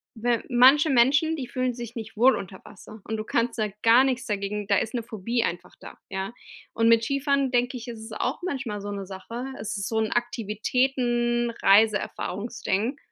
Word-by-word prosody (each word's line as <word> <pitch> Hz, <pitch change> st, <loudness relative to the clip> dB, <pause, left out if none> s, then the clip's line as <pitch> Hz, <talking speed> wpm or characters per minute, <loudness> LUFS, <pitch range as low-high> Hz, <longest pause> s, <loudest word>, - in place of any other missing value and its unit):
we 235 Hz, 0 st, 0 dB
manche 265 Hz, +5 st, +6 dB
Menschen, 285 Hz, +5 st, +3 dB
die 260 Hz, -5 st, -5 dB
fühlen 255 Hz, -1 st, -1 dB
sich 235 Hz, 0 st, -8 dB
nicht 220 Hz, -1 st, -7 dB
wohl 250 Hz, +1 st, +5 dB
unter 190 Hz, -1 st, -8 dB
Wasser 215 Hz, +2 st, -13 dB
und 220 Hz, -, -3 dB
du 215 Hz, -, -3 dB
kannst 235 Hz, +1 st, 0 dB
ja 215 Hz, -, +1 dB
gar 230 Hz, +3 st, +6 dB
nichts 260 Hz, -1 st, -1 dB
dagegen 205 Hz, 0 st, -3 dB
da 200 Hz, -, +3 dB
ist 220 Hz, -, -2 dB
'ne 240 Hz, -2 st, -2 dB
Phobie 230 Hz, +2 st, -2 dB
einfach 175 Hz, +1 st, -4 dB
da, -, -, -12 dB
ja? 190 Hz, +3 st, -4 dB, 0.4 s
Und 230 Hz, 0 st, +2 dB
mit 230 Hz, 0 st, +5 dB
Skifahren 275 Hz, 0 st, 0 dB
denke 245 Hz, +1 st, +1 dB
ich, 240 Hz, 0 st, -9 dB
ist 230 Hz, -2 st, -7 dB
es 220 Hz, -, -10 dB
auch -, -, -2 dB
manchmal 260 Hz, -, -3 dB
so 205 Hz, -, -6 dB
'ne 200 Hz, -1 st, -5 dB
Sache. 230 Hz, +6 st, -7 dB
Es 210 Hz, -, -4 dB
ist 195 Hz, -, -3 dB
so 225 Hz, -, -2 dB
'n 220 Hz, -, -1 dB
Aktivitäten-Reiseerfahrungs-Ding. 240 Hz, -1 st, 0 dB
235 Hz, 190 wpm, -25 LUFS, 210-250 Hz, 0.4 s, manche